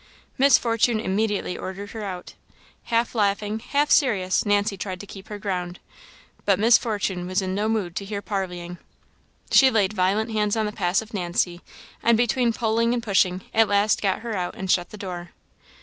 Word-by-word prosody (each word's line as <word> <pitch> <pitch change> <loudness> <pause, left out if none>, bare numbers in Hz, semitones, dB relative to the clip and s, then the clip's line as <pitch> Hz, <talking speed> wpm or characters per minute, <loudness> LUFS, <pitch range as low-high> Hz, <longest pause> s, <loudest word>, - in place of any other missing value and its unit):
Miss 275 +1 +6
Fortune 230 -1 +1
immediately 205 -2 -1
ordered 200 +2 -7
her 220 -2 -6
out. 185 -3 -6 0.5
Half 230 0 0
laughing, 210 0 0
half 285 +5 0
serious, 200 -10 +3
Nancy 205 0 +2
tried 185 -1 -5
to - - -9
keep 195 0 -11
her 210 - -6
ground, 180 -3 -3 0.7
but 200 -2 +3
Miss 225 +4 +5
Fortune 195 -5 -1
was 185 +2 0
in 190 -1 -2
no 210 +3 0
mood 200 -6 -1
to 200 - -3
hear 200 0 -4
parleying. 180 -4 -4 0.7
She 265 - +7
laid 215 -4 +1
violent 205 +4 +1
hands 210 0 0
on 220 - +1
the 210 - -2
passive 205 +3 -1
Nancy, 175 -2 -1 0.4
and 235 -1 +4
between 240 +1 +2
pulling 230 +1 +1
and 235 - -3
pushing, 190 -3 +1
at 225 -1 +4
last 205 +1 +2
got 195 -2 0
her 230 -2 -4
out 180 -2 -3
and 190 -1 -2
shut 175 -1 +1
the 215 - -10
door. 175 -3 -7
205 Hz, 180 wpm, -24 LUFS, 185-225 Hz, 0.7 s, She